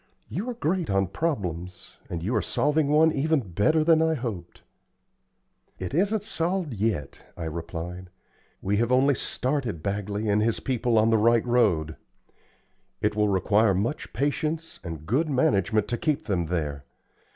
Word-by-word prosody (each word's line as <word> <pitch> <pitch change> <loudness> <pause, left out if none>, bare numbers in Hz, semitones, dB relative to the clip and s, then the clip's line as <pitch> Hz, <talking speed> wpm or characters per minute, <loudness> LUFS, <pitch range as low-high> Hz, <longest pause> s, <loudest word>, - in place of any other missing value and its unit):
"You 210 +9 -3
are 245 - -4
great 180 -5 -1
on 95 0 +2
problems, 90 - -4
and 85 -1 -4
you 115 +7 -1
are 110 - +2
solving 150 - +1
one 155 +2 +5
even 155 +2 +1
better 155 - +3
than 160 0 +5
I 160 0 +2
hoped." 105 - -6 1.1
"It 90 - -5
isn't 200 +6 +1
solved 175 - -1
yet," 100 -9 -2 0.2
I 85 - -5
replied. 85 +3 -6 0.5
"We 100 +2 +1
have 120 +2 +1
only 135 +3 +4
started 125 - -2
Bagley 100 +1 -2
and 105 0 +3
his 115 +1 +1
people 125 -3 0
on 110 +1 +4
the 110 - +4
right 115 +1 +4
road. 100 -11 +2 1.0
It 105 0 0
will 105 0 +2
require 100 +1 +3
much 115 +11 -2
patience 155 +3 -2
and 80 -3 -7
good 140 - +1
management 110 - +2
to 120 - -2
keep 155 -4 0
them 90 -6 -1
there. 75 -5 -2
115 Hz, 155 wpm, -26 LUFS, 95-150 Hz, 1.1 s, one